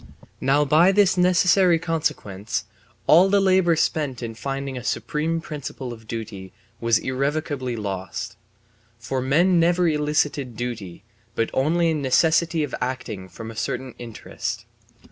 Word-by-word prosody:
Now 145 +2 +2
by 160 +6 +5
this 200 -2 +4
necessary 180 0 +4
consequence 110 - -2 0.4
all 180 +5 +6
the 200 +1 +4
labour 185 -3 +3
spent 145 -5 -1
in 115 -1 -4
finding 135 +3 -4
a 125 - -6
supreme 160 +5 -1
principle 140 -5 -6
of 110 -1 -14
duty 105 -5 -6 0.3
was 115 -1 +3
irrevocably 135 -1 -2
lost. 95 -3 -5 0.6
For 130 +2 -3
men 170 +7 +3
never 175 +1 +3
elicited 150 -5 0
duty, 110 -7 -5 0.3
but 115 - 0
only 165 +5 +2
a - - +1
necessity 160 +3 +2
of 145 - -5
acting 115 -7 -4
from 115 +5 -8
a - - -12
certain 125 +2 -3
interest. 115 -3 -6
140 Hz, 135 wpm, -23 LUFS, 115-165 Hz, 0.6 s, all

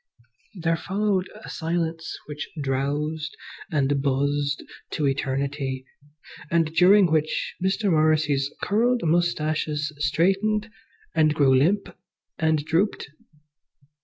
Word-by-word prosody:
There 165 -2 0
followed 195 0 -1
a - - -9
silence 165 -1 -3
which 150 0 -6
drowsed 145 +3 -2 0.3
and 140 -2 +1
buzzed 140 +1 0 0.3
to 150 - 0
eternity, 135 -1 -2 0.6
and 165 -2 +1
during 185 +1 +6
which 155 -1 0
Mr. 195 +1 +1
Morrissy's 155 -3 +2
curled 235 +4 +2
moustaches 155 -2 0
straightened 195 +8 +1 0.4
and 155 -2 +3
grew 135 -3 +4
limp 180 +6 +1 0.4
and 160 -2 +1
drooped. 165 -2 0
155 Hz, 100 wpm, -24 LUFS, 145-175 Hz, 0.6 s, during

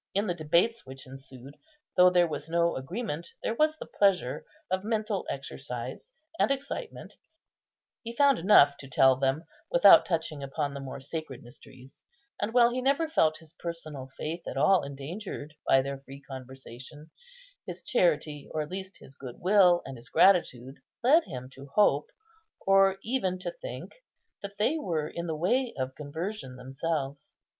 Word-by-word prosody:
In 200 +2 +2
the 180 - 0
debates 175 +8 +1
which 135 +1 -10
ensued, 135 +1 -12 0.4
though 180 0 +7
there 175 -1 +4
was 160 0 -5
no 170 0 +2
agreement, 170 - -4 0.2
there - - 0
was 310 +5 +2
the - - -7
pleasure 190 -10 +1 0.3
of 185 0 0
mental 215 -2 -2
exercise 135 - -6 0.3
and - - +3
excitement; 280 - -5 0.8
he 230 -1 -7
found 280 0 +4
enough 145 -6 +6
to 135 - -10
tell 135 0 +5
them 135 +4 0 0.2
without - - +8
touching 160 -4 -2
upon 140 +1 -3
the 140 - -6
more 135 0 -7
sacred 140 -2 -6
mysteries; 130 +2 -15 0.4
and 205 - -1
while 240 0 +5
he 255 +1 -2
never 280 +5 +2
felt 160 - +2
his 160 -1 -16
personal 155 -6 -6
faith 165 +3 -4
at - - -5
all 180 +7 +4
endangered 145 +3 -7
by 135 0 +5
their 140 0 -5
free 135 +1 -13
conversation, 130 +3 -10 0.6
his - - -7
charity, 160 - 0
or 155 - 0
at 150 - -11
least 190 0 -6
his 135 - -14
good 130 -3 -10
will 180 -2 +5
and 135 -1 -7
his 120 +1 -11
gratitude, 135 -9 +3 0.2
led 310 +7 +5
him 125 -1 -7
to 135 +1 -12
hope, 150 -9 +3 0.6
or 195 0 +5
even 215 -7 -1
to 185 - -4
think, - - -8 0.5
that 200 0 -8
they 275 +10 +1
were 160 - -2
in 170 +2 -5
the 160 - -2
way 245 +10 0
of 130 0 -3
conversion 150 +1 -6
themselves. 135 +2 -4
160 Hz, 165 wpm, -28 LUFS, 135-200 Hz, 0.8 s, without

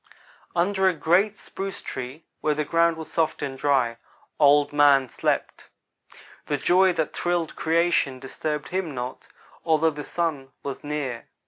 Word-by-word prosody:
"Under 190 +2 +3
a 180 - -2
great 185 +7 +2
spruce 195 0 -6
tree 130 +5 -6
where 150 -1 +1
the 150 0 -1
ground 165 +2 +2
was 160 - -8
soft 160 -3 0
and 135 -2 -3
dry, 130 -4 +1 0.4
Old 145 0 +5
man 140 -3 +5
slept. - - -2 0.8
The 145 - 0
joy 185 +5 +4
that 160 -2 -2
thrilled 175 -2 -1
creation 160 -4 +1
disturbed 150 +3 -4
him 180 -6 -2
not, 125 +1 -6 0.4
although 160 0 +3
the 150 0 -7
Sun 145 -6 -3
was 140 -1 -5
near. 145 -5 -4
150 Hz, 145 wpm, -25 LUFS, 140-170 Hz, 0.8 s, Old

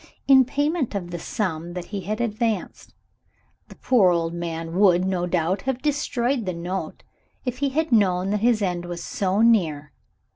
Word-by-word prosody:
in 265 -1 +7
payment 285 -1 -1
of 175 -3 -4
the 175 - -4
sum 170 -2 -3
that 180 -1 -5
he 200 - -2
had 210 +5 -4
advanced. 225 -3 -2 0.7
The - - -14
poor 225 -8 +3
old 170 -1 0
man 165 -1 -5
would, 185 -3 +5
no 180 -2 -1
doubt, 180 +2 0
have 260 -2 -1
destroyed 270 -5 -1
the 180 - -2
note 180 +3 -5 0.4
if 250 0 -3
he 280 -1 +1
had 310 +2 -1
known 190 -4 +2
that 210 - 0
his 225 -1 +2
end 175 -2 -2
was 175 -1 -6
so 195 +1 -1
near. 160 -11 +2
195 Hz, 175 wpm, -23 LUFS, 175-235 Hz, 0.7 s, in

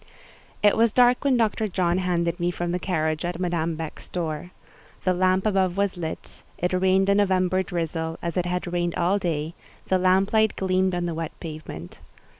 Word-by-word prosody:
It 205 - +5
was 230 0 +3
dark 245 +2 +4
when 270 -3 +3
Dr. 220 -1 +1
John 180 -2 0
handed 175 -1 0
me 175 0 +1
from 175 -1 -3
the 180 - -1
carriage 160 -4 -1
at 175 0 -3
Madame 170 -2 -1
Beck's 160 -1 -7
door. 165 -1 -3 0.5
The 185 - +2
lamp 185 +1 +2
above 190 -3 +1
was 200 -1 +1
lit; 165 -2 -6 0.2
it 180 +1 -1
rained 190 +1 +3
a 200 - +4
November 185 -2 +2
drizzle, 165 -2 -3
as 170 - -4
it 180 -1 0
had 180 0 -2
rained 175 -1 0
all 190 +4 +2
day: 165 -3 -2 0.4
the 185 - +3
lamplight 195 +4 +3
gleamed 185 -1 +1
on 175 0 -1
the 170 - -2
wet 165 0 -5
pavement. 155 - -8
180 Hz, 185 wpm, -25 LUFS, 170-190 Hz, 0.5 s, It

